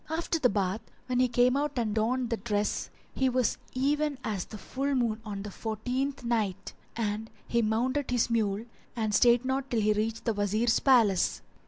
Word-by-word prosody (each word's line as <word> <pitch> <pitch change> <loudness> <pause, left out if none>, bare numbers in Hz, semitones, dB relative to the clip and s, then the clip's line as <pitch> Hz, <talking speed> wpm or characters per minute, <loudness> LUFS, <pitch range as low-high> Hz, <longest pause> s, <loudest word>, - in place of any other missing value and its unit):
After 330 +1 -1
the 250 - +4
bath, 200 0 -1 0.2
when 250 -1 0
he 255 - +4
came 250 +1 +3
out 295 +1 0
and 225 -3 0
donned 240 +3 0
the 230 - +1
dress, 210 -3 -1 0.2
he 265 -1 +2
was 250 -2 +1 0.2
even 290 +2 +1
as 200 -4 -2
the 215 - -9
full 275 +6 -2
moon 230 -3 0
on 200 -2 -5
the 205 - -6
fourteenth 250 +7 -3
night; 210 -5 -1 0.2
and 220 -1 -2 0.2
he 235 - +2
mounted 250 +6 0
his 245 -2 +2
mule 220 -2 0 0.3
and 220 -3 -1
stayed 240 +2 +5
not 265 +1 -1
till 230 -2 +1
he 215 0 +3
reached 220 +2 -2
the 230 - +1
Wazir's 215 +3 +1
palace. 230 -9 +3
235 Hz, 185 wpm, -29 LUFS, 215-255 Hz, 0.3 s, stayed